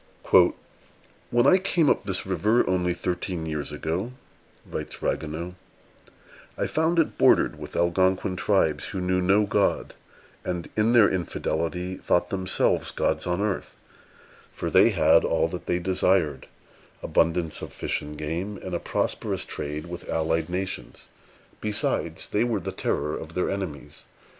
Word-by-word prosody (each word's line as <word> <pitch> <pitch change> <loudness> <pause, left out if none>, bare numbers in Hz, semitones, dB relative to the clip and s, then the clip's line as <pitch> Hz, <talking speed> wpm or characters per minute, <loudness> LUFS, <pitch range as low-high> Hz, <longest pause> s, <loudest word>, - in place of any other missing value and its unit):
"When 120 0 +3
I 185 - +6
came 180 -4 +2
up - - +2
this 95 -2 0
great 95 - -7
river, 105 +7 +2
only 90 -1 +1
thirteen 90 -1 -3
years 75 -2 -3
ago," 85 +10 -3 0.5
writes - - -6
Ragueneau, 80 +3 -2 1.0
"I - - 0
found 160 +2 +1
it 165 - +1
bordered - - +4
with - - -9
Algonquin 95 +2 +2
tribes, 80 -7 +1
who 95 - -4
knew 90 0 +1
no 95 +4 +4
God, 100 -1 0 0.5
and, 90 -2 -3
in 110 +2 +3
their 115 -4 +7
infidelity, 90 0 -2
thought 90 0 +1
themselves 95 -1 0
gods - - -1
on 90 +2 0
earth; 105 -2 -2 0.8
for - - -4
they - - +6
had - - +4
all - - +2
that - - -7
they 90 - +1
desired, 90 -5 +1 0.6
abundance 80 -1 +1
of - - -7
fish - - -2
and 75 0 -8
game, 85 +7 -3
and 95 - -5
a 85 - 0
prosperous - - -2
trade 75 +2 -5
with 85 0 -8
allied 80 +1 0
nations: 95 +1 -5 0.5
besides, 105 -1 -1
they 105 - +1
were 115 -4 0
the 85 - -5
terror 75 - -1
of 80 +1 -8
their 90 - 0
enemies. 95 -7 -6
90 Hz, 150 wpm, -26 LUFS, 80-100 Hz, 1.0 s, their